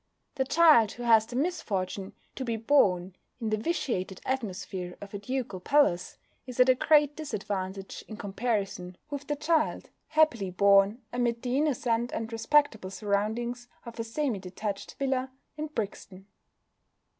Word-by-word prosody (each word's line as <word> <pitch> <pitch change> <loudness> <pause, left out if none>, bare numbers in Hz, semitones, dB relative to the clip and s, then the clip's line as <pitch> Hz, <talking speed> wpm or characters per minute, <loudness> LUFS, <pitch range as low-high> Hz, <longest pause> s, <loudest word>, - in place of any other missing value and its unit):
The 265 -2 0
child 300 -9 +6
who 245 - -8
has 225 -2 +5
the 240 - -8
misfortune 200 - -2 0.2
to 265 - -5
be 235 -2 -1
born 190 -8 +2 0.2
in 225 -3 -2
the 215 - +2
vitiated 215 - -2
atmosphere 190 -7 -4
of 205 0 -10
a 200 - -4
ducal 250 -3 -3
palace 185 -6 +2 0.3
is 250 -1 -8
at 250 +1 +6
a - - +8
great 295 +2 +4
disadvantage 195 -8 -4
in 215 - -8
comparison 195 -4 -2
with 285 0 -5
the 295 - 0
child 310 +1 0 0.2
happily 305 -11 +2
born 200 +5 +4
amid 240 -1 0
the 250 0 -1
innocent 245 -5 +1
and 225 0 -3
respectable 225 -3 +2
surroundings 220 +5 -2 0.2
of 235 -1 -9
a - - 0
semi 230 -1 -2
detached 195 +2 -5
villa 265 -1 0 0.3
in 305 +1 -4
Brixton. 200 -7 -6
230 Hz, 145 wpm, -28 LUFS, 200-265 Hz, 0.3 s, a